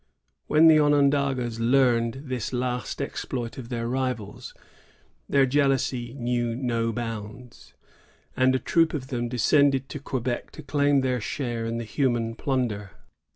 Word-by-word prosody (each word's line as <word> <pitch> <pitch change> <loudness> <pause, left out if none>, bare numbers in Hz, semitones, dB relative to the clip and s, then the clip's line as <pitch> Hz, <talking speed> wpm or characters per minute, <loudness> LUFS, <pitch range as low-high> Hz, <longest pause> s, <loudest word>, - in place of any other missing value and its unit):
When 155 +2 +6
the 155 -1 +7
Onondagas 140 -5 +2
learned 120 0 +2
this 125 -5 -3
last 125 -1 -2
exploit 120 -1 -5
of 120 -2 -8
their 115 -2 -3
rivals, 125 -5 -4 0.7
their 140 -1 +4
jealousy 130 -3 0
knew 120 -2 -1
no 115 -2 -1
bounds, 115 +1 -7 0.6
and 130 0 +3
a - - +3
troop 165 +4 +2
of 130 -3 -5
them 120 -2 -2
descended 135 +2 +2
to 145 - -6
Quebec 130 -3 -3
to 155 - -10
claim 145 -1 +2
their 125 -2 -1
share 120 -1 -3
in 115 0 -2
the 115 - -3
human 120 -2 0
plunder. 115 -7 -2
125 Hz, 140 wpm, -25 LUFS, 115-135 Hz, 0.7 s, the